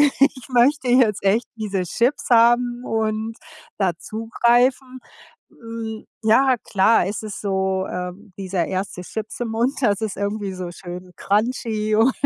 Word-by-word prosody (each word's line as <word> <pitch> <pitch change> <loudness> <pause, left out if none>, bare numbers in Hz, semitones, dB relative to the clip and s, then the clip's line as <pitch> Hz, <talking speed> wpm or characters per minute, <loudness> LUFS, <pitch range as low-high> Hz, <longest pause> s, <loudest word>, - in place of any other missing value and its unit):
ich 275 -2 +2
möchte 255 +2 +3
jetzt 245 -5 +3
echt 215 +4 +2
diese 205 -4 -2
Chips 240 - 0
haben 240 +1 +4
und 220 0 -2 0.4
da 190 -3 +2
zugreifen.“ 240 +5 +1 0.5
Äm, 225 -1 -7 0.2
ja, 255 +4 +4
klar, 200 0 +3
es 205 +3 -3
ist 215 -2 -6
so, 190 -1 0
ähm, 180 +3 -6
dieser 185 -3 -2
1. 190 -1 -3
Chips 220 +5 -6
im 240 - -1
Mund, 235 +4 +1
das 210 -6 +2
ist 215 -2 -2
irgendwie 200 -1 -2
so 180 -1 -6
schön 180 0 -9
crunchy 215 +1 0
und 230 +4 +4
220 Hz, 140 wpm, -22 LUFS, 195-240 Hz, 0.5 s, haben